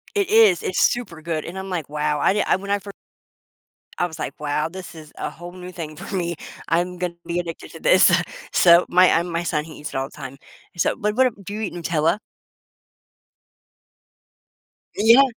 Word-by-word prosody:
It 400 -2 +1
is. 215 -5 +6
It's 185 - -1
super 200 -10 +1
good. 160 -2 -3
And 180 +3 -7
I'm 190 0 -6
like, 165 -6 -3
"Wow," 150 0 -1
I - - +4
did 210 - +1
I - - +3
when 200 +1 -7
I 205 - +2
fir 200 - -9 1.1
I 175 - +2
was 165 -2 -9
like, - - -5
"Wow, 150 +1 -1
this 180 0 -9
is 155 -1 -12
a - - -2
whole 175 +1 -10
new 180 0 -9
thing 155 -4 -7
for 195 +3 -8
me, 170 -2 -1 0.3
I'm 175 +2 0
gonna 175 -1 -2
be 175 0 -2
addicted 165 -2 -7
to 165 - -11
this." 185 0 +6 0.4
So, 170 0 +6
my 185 +1 +6
I 165 - +3
my 170 -1 -3
son, 150 -3 -1
he 160 0 -11
eats 150 - -6
it - - -6
all 135 +1 -1
the - - -18
time. 135 +1 -8 0.4
So, - - +1
but 210 +1 -1
what 260 0 +5
ab 205 -5 -4
do 200 - -6
you 215 - -4
eat 205 - -3
Nutella? 165 +1 +1 2.8
Yeah. 230 +6 +7
175 Hz, 205 wpm, -22 LUFS, 160-190 Hz, 2.8 s, Yeah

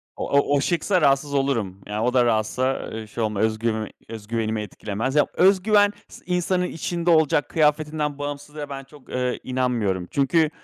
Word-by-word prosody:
O - - -4
o 140 0 +3
o 140 - +2
şıksa 175 +3 +1
rahatsız 140 0 +2
olurum. 115 -9 -1
Yani 105 +1 -3
o 125 +2 +1
da 125 -2 +4
rahatsa, 120 +4 0
eee, 110 -1 -6
şey 115 +2 -4
olma 105 -2 -1
özgüv 110 0 0 0.2
öz 110 -2 -8
güvenimi 110 -1 -1
etkilemez. 105 +5 -4
Ya, 150 - +4
öz 190 +1 +4
güven 205 -1 +4 0.2
is - - -13
insanın 180 0 0
içinde 170 0 -2
olacak, 160 -3 +3
kıyafetinden 150 -1 +1
bağımsız 145 +1 -6
ve 145 -1 -6
ben 135 -1 -6
çok, 135 0 -18
eee, 125 0 -1
inanmıyorum. 120 -8 -1
Çünkü 155 +3 +2
135 Hz, 180 wpm, -23 LUFS, 110-155 Hz, 0.2 s, da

